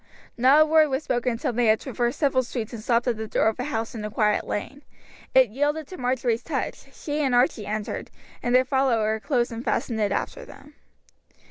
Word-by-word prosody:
Not 265 +5 +5
a - - 0
word 310 -1 +4
was 265 +3 -1
spoken 245 -2 0
until 245 +2 -2
they 240 0 +2
had 215 0 +4
traversed 240 -2 -2
several 275 -4 +2
streets 240 -2 -5
and 225 - -6
stopped 235 +1 +1
at 240 -3 0
the 220 0 -5
door 220 - +2
of 220 - -6
a 250 - -2
house 225 -6 -3
in 220 -3 -6
a 210 - -3
quiet 210 -1 +1
lane; 270 +7 -4 0.5
it 260 -3 +6
yielded 295 +5 -1
to 370 - -8
Marjory's 245 -2 0
touch, 275 -1 -4
she 295 +2 -4
and 260 -3 +2
Archie 245 -4 +2
entered, 215 0 -4 0.3
and 245 +1 +1
their 255 +1 +5
follower 235 -5 +1
closed 240 -1 0
and 230 +1 -6
fastened 230 -3 -1
it 205 -2 +1
after - - -3
them. 295 - -14
245 Hz, 215 wpm, -25 LUFS, 225-270 Hz, 0.5 s, it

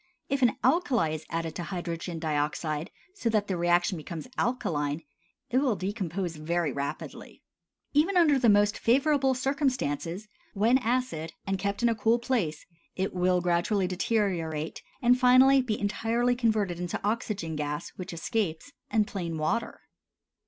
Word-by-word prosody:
If 275 0 0
an 245 -4 +3
alkali 260 - +3
is 155 - -6
added 165 -1 -3
to 175 - -5
hydrogen 175 -2 -4
dioxide 155 +1 -2 0.2
so 250 - -1
that 215 -2 +1
the 195 - -2
reaction 175 +1 +2
becomes 160 +3 -7
alkaline, 155 - -1 0.5
it 255 - +4
will 265 -6 +2
decompose 185 -4 -3
very 165 0 -1
rapidly. 140 +1 -6 0.5
Even 330 +6 +3
under 305 -6 +5
the 240 -3 +4
most 205 0 +4
favorable 270 +2 +3
circumstances 250 - -1 0.3
(when 230 +6 +4
acid, 230 -10 -1
and 195 -1 -1
kept 200 +3 -2
in 240 - +5
a - - +2
cool 225 +1 +2
place) 230 - -1 0.3
it 190 +1 -2
will 180 0 +2
gradually 180 +3 +1
deteriorate, 180 -5 -1 0.2
and 245 +1 +5
finally 260 +2 +6
be 225 -4 -2
entirely 230 +4 +1
converted 215 -7 0
into 175 -1 -3
oxygen 205 -6 -2
gas, 150 0 -3
which 185 - -8
escapes, 175 - -2 0.2
and 215 -2 +2
plain 170 -6 -4
water. 160 +10 -2
200 Hz, 145 wpm, -28 LUFS, 165-245 Hz, 0.5 s, finally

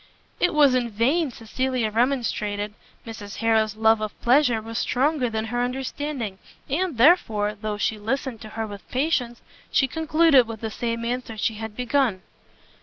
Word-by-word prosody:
It 355 -3 +2
was 290 -3 +6
in 245 -2 +1
vain 270 +9 +1
Cecilia 245 0 -2
remonstrated: 215 -4 0 0.3
Mrs 210 -3 -8
Harrel's 220 -2 +1
love 220 0 +3
of 215 -1 -5
pleasure 245 -2 +4
was 225 +1 -5
stronger 270 0 +1
than 220 0 -2
her 245 +2 -2
understanding, 255 -4 -3 0.3
and 325 0 -1
therefore, 225 - +4
though 210 0 -4
she 215 +1 -1
listened 245 +2 -3
to 215 - -9
her 225 - -1
with 205 -2 -10
patience, 250 -4 -1 0.3
she 270 - +3
concluded 315 -3 +4
with 225 -2 -7
the 220 -1 -3
same 230 +1 -3
answer 240 -2 -3
she 220 +2 0
had 220 0 -7
begun. 250 -5 0
235 Hz, 160 wpm, -24 LUFS, 220-265 Hz, 0.3 s, was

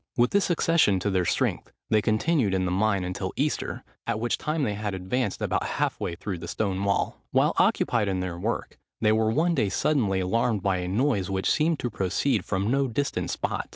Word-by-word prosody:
With 120 +1 +3
this 200 -1 +2
accession 165 - +3
to 100 - 0
their 90 -2 +1
strength, - - -1 0.2
they 110 -1 +4
continued 110 - +1
in 95 -1 0
the 90 - -1
mine 100 0 +1
until 90 0 -4
Easter, - - -2 0.2
at 110 - -1
which 120 +1 -1
time 155 0 -1
they 105 - 0
had 105 -1 -3
advanced 100 +4 -2
about - - 0
half - - 0
way 85 - -3
through 95 0 -5
the 85 - -7
stone 95 0 -1
wall. 100 0 0
While - - +3
occupied 110 -4 +2
in 95 -1 -1
their 90 -2 -4
work, - - -3 0.2
they 110 -1 +3
were 110 0 +2
one 160 +9 +2
day 105 -11 +1
suddenly 110 -8 +1
alarmed 105 +2 0
by 95 -2 +1
a 90 0 -3
noise, 105 -1 +1
which 95 -1 -1
seemed 160 +1 +2
to 120 - -2
proceed 100 +9 0
from 100 +3 -1
no 135 0 +2
distant 140 +4 -2
spot. - - -3
105 Hz, 210 wpm, -26 LUFS, 95-125 Hz, 0.2 s, they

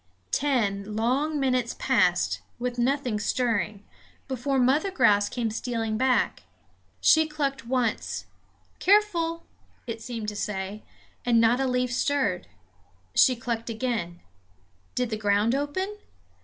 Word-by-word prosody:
Ten 210 -7 0
long 275 +7 +1
minutes 255 -3 0
passed, - - +2 0.2
with 245 0 -3
nothing 250 -3 0
stirring, 215 -3 -1 0.4
before 265 +1 -1
Mother 270 +9 +3
Grouse 205 - +3
came 235 -3 -2
stealing 225 -1 -2
back. 255 +3 +1 0.6
She 315 0 +5
clucked 275 -5 -3
once 245 -3 -1 0.5
"Careful!" 345 -5 +2 0.4
it 230 -2 -5
seemed 225 -2 -4
to 210 - -7
say; 205 0 -4 0.4
and 235 -2 +3
not 230 +2 +4
a 270 - +1
leaf 250 -1 0
stirred. 285 +3 0 0.7
She 255 - +5
clucked 235 -1 -4
again 220 -7 -3 0.7
did 250 -2 -1
the 215 - -1
ground 205 +2 +2
open? 375 +9 -2
245 Hz, 120 wpm, -26 LUFS, 220-275 Hz, 0.7 s, She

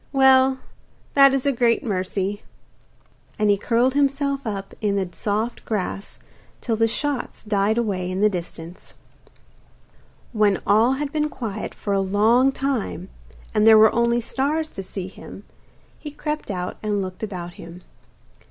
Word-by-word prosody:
'Well, 265 -1 +5 0.6
that 275 -1 +7
is 270 0 -1
a 280 - +3
great 235 -2 +1
mercy.' 195 -1 -2 1.0
And 210 -1 +3
he - - +4
curled 235 +5 +1
himself 280 -1 0
up 195 -2 -5
in 205 -2 0
the 195 -2 0
soft 215 +6 -3
grass 200 -2 -4 0.4
till 230 - -1
the 225 +1 +2
shots 280 +3 -3
died 210 0 +1
away 195 -6 -1
in 185 +1 -3
the 210 - +5
distance. 175 -2 -7 1.4
When 210 -3 +3
all 225 +5 +4
had 280 +1 -3
been 300 0 0
quiet 220 -7 -5
for 200 - -3
a 195 - +2
long 220 +7 +3
time, 260 -9 -3 0.4
and 215 0 +3
there 220 -1 +9
were 215 0 +6
only 235 0 +2
stars 295 +6 -1
to 195 - -7
see 190 0 -6
him, 190 +1 -11 0.6
he 300 - -7
crept 300 -1 -5
out 180 -2 -4
and 205 -2 -1
looked 185 -1 -8
about 180 -5 -5
him. 175 +1 -11
220 Hz, 150 wpm, -22 LUFS, 195-265 Hz, 1.4 s, there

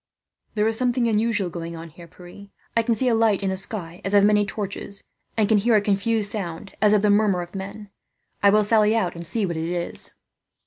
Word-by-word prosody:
"There 210 0 +2
is 225 0 0
something 245 -1 +1
unusual 215 -4 0
going 170 0 -6
on, 165 0 -9
Pierre. 175 +4 -13 0.3
I 230 - +4
can 230 0 0
see 255 +4 0
a 240 - +3
light 220 -3 +2
in 190 - 0
the - - -1
sky, 185 -3 -5
as 195 +2 0
of 200 - +6
many 205 0 +3
torches; 200 -1 -5 0.3
and 215 -2 +3
can 215 -1 +4
hear 230 +2 +3
a - - +6
confused 205 +1 0
sound, 195 -2 -6
as 210 -1 +5
of 210 -1 +3
the 210 - +4
murmur 205 -4 +2
of 175 - -13
men. 200 +1 -7 0.5
I 200 - +6
will 210 +1 +4
sally 215 0 +3
out 185 -6 0
and 170 0 -5
see 220 +1 0
what 170 -3 -3
it 160 +1 -3
is." 175 -1 -2
205 Hz, 225 wpm, -23 LUFS, 180-220 Hz, 0.5 s, of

